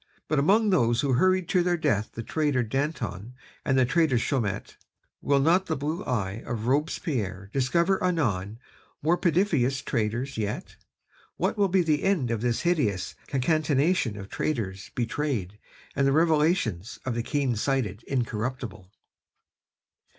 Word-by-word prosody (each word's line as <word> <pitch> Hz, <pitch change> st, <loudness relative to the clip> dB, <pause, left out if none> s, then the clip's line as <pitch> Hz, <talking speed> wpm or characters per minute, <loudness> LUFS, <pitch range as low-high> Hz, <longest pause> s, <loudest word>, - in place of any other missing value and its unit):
But 150 Hz, -2 st, +1 dB
among 205 Hz, +8 st, +4 dB
those 120 Hz, -9 st, +3 dB
who 140 Hz, -2 st, +1 dB
hurried 185 Hz, +6 st, +3 dB
to 180 Hz, -, +3 dB
their 175 Hz, 0 st, +1 dB
death 110 Hz, -10 st, 0 dB
the 115 Hz, -, -4 dB
traitor 145 Hz, -2 st, 0 dB
Danton 125 Hz, -, -3 dB, 0.3 s
and 130 Hz, -, +1 dB
the 130 Hz, -, +5 dB
traitor 155 Hz, -1 st, +2 dB
Chaumette, 115 Hz, -5 st, -2 dB, 0.5 s
will 140 Hz, -1 st, +2 dB
not 175 Hz, +7 st, +3 dB
the 160 Hz, -, 0 dB
blue 155 Hz, +7 st, -3 dB
eye 105 Hz, -3 st, -2 dB
of 115 Hz, -2 st, -4 dB
Robespierre 125 Hz, -, -1 dB
discover 170 Hz, +9 st, +2 dB
anon 110 Hz, -, 0 dB, 0.5 s
more 165 Hz, +3 st, +4 dB
perfidious 160 Hz, -8 st, +1 dB
traitors 120 Hz, +3 st, -2 dB
yet? 110 Hz, -, -4 dB, 0.6 s
What -, -, 0 dB
will 205 Hz, -2 st, +3 dB
be 185 Hz, 0 st, +3 dB
the 155 Hz, -3 st, +1 dB
end 170 Hz, -12 st, +1 dB
of 115 Hz, -2 st, -1 dB
this 120 Hz, -1 st, 0 dB
hideous 135 Hz, -, 0 dB
concatenation 145 Hz, -, +1 dB
of 100 Hz, -1 st, -7 dB
traitors 100 Hz, -8 st, -3 dB
betrayed 115 Hz, -6 st, -2 dB, 0.4 s
and 135 Hz, 0 st, +2 dB
the 135 Hz, -, +3 dB
revelations 150 Hz, -, +2 dB
of 130 Hz, -, -1 dB
the 120 Hz, -, -1 dB
keen 135 Hz, 0 st, 0 dB
sighted 110 Hz, -3 st, -1 dB
Incorruptible?..." 120 Hz, -5 st, -3 dB
135 Hz, 145 wpm, -27 LUFS, 115-160 Hz, 0.6 s, the